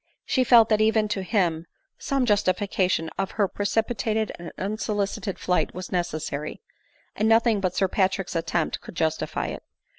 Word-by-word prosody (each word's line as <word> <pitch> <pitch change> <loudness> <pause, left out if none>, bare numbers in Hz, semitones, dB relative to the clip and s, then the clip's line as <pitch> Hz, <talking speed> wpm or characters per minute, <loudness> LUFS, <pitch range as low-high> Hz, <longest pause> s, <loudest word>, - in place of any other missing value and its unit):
She 260 - +2
felt 235 -3 +6
that 215 -1 +3
even 215 0 +3
to 200 -2 -2
Aiwi, 175 -5 0 0.3
some 275 -2 0
justification 185 -5 +1
of 195 -1 0
her 205 -2 +3
precipitate 220 +1 -1
and 170 - -8
unsolicited 205 -1 -2
flight 180 - 0
was 185 0 -6
necessary; 155 -4 -3 0.6
and 215 +1 +1
nothing 225 -2 +4
but 185 -2 -1
Sir 195 - +2
Patrick's 190 -1 0
attempt 165 0 -1
could - - -11
justify 160 -1 -1
it. - - -5
195 Hz, 150 wpm, -25 LUFS, 175-215 Hz, 0.6 s, felt